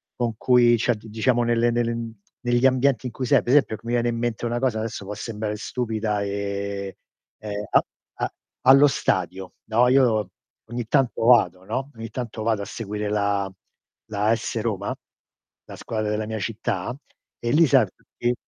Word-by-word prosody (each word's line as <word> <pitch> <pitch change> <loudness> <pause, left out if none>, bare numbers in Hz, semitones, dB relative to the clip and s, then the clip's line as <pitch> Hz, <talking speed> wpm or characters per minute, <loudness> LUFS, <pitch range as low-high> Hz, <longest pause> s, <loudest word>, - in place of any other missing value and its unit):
con 120 -3 -1
cui 120 -1 +5
cioè 120 +1 +1
diciamo 110 +3 0
nelle 120 0 +2
nelle 115 -1 -1 0.3
negli 120 +1 +2
ambienti 130 -1 +3
in - - -6
cui 130 - -3
sei, - - +5
per - - -7
esempio, 115 -7 +3
c - - -26
mi 120 - -2
viene 120 0 +2
in 115 - -2
mente 120 0 -2
una 120 +1 -1
cosa 125 -4 0
adesso, 110 -2 -4
può 100 - -5
sembrare 105 0 -4
stupida 110 -2 -2
e, 100 -1 -4 0.4
ehm, 105 -1 -5
a - - +5 0.3
a - - -3 0.3
allo 135 +3 +7
stadio, 95 -7 -1
no, 115 +3 +3
io 115 -7 +3 0.3
ogni 120 0 -5
tanto 130 -3 +1
vado, 95 -7 +5
no, 130 +7 -3
ogni 115 0 -7
tanto 120 -2 -5
vado 110 -2 0
a - - -6
seguire 105 0 -4
la 100 -2 0 0.6
la 105 -1 -1
AS 115 0 0
Roma, 100 -3 -2 0.7
la - - -10
squadra 110 -2 -3
della 105 0 -1
mia 110 0 -3
città 105 +1 -3 0.4
e 120 - -2
lì 160 +3 +5
sai, - - +5
tutti 120 +1 -3
115 Hz, 175 wpm, -24 LUFS, 105-120 Hz, 0.7 s, allo